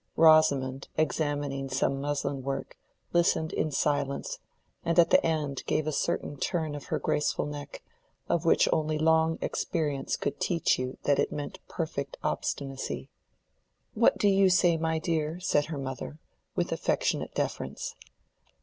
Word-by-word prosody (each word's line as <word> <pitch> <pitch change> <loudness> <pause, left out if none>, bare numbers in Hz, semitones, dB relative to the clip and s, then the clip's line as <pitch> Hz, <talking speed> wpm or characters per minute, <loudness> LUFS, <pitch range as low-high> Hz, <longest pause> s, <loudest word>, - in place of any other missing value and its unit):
Rosamond, 140 -5 +4
examining 145 -3 -1
some 135 +1 0
muslin 140 -1 -2
work, 135 +1 -4 0.4
listened 170 -2 +2
in 155 - 0
silence, 140 -1 -1 0.4
and 170 0 0
at 170 - +6
the - - +6
end 150 -4 -1
gave 155 - +1
a 155 - 0
certain 145 0 -1
turn 160 +1 -1
of 145 -1 -7
her - - -1
graceful 150 - 0
neck, 145 -1 -7 0.4
of 170 -1 +1
which 165 - +4
only 155 -1 0
long 160 +1 +3
experience 145 -5 -1
could 140 - -3
teach 170 -6 +1
you 130 0 -3
that 145 - +3
it - - +1
meant 145 -1 -5
perfect 155 -4 -4
obstinacy. 135 -1 -3 0.8
"What - - +4
do 205 - +2
you 195 -1 +5
say, 180 -2 +4
my 160 0 0
dear?" 160 0 -1
said 145 -5 +2
her 160 -2 -5
mother, 135 +2 -5 0.4
with - - -1
affectionate - - 0
deference. - - -3
150 Hz, 145 wpm, -29 LUFS, 140-160 Hz, 0.8 s, at